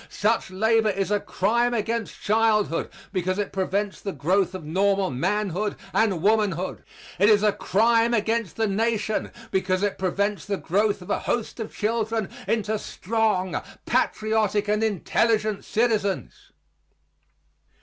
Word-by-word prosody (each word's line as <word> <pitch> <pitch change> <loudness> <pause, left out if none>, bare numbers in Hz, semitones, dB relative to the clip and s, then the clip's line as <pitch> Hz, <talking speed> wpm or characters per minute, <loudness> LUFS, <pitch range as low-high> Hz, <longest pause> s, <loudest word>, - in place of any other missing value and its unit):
Such 220 0 0
labor 220 +3 +2
is 195 0 -1
a 205 - +3
crime 235 +6 +1
against 225 0 -3
childhood 215 -4 +2 0.2
because 185 +1 -1
it 205 -1 -2
prevents 195 +1 -1
the 195 - -3
growth 180 +4 +1
of 185 - -6
normal 195 +3 +1
manhood 205 +8 -1 0.2
and 195 -7 +1
womanhood. 200 -4 +1 0.4
It 205 +3 +5
is 210 -1 +5
a 210 - +5
crime 230 +4 +2
against 225 -3 0
the 225 - +1
Nation 215 +1 0 0.2
because 190 0 0
it 205 - -1
prevents 200 +2 -1
the 200 -1 -2
growth 200 +2 0
of - - -6
a - - +1
host 235 0 -2
of 220 - -5
children 220 -1 -1 0.2
into 220 -1 0
strong, 210 -3 -1 0.2
patriotic 215 -1 +1
and 210 +1 +1
intelligent 215 +1 +1
citizens. 215 -4 0
210 Hz, 135 wpm, -25 LUFS, 190-220 Hz, 0.4 s, It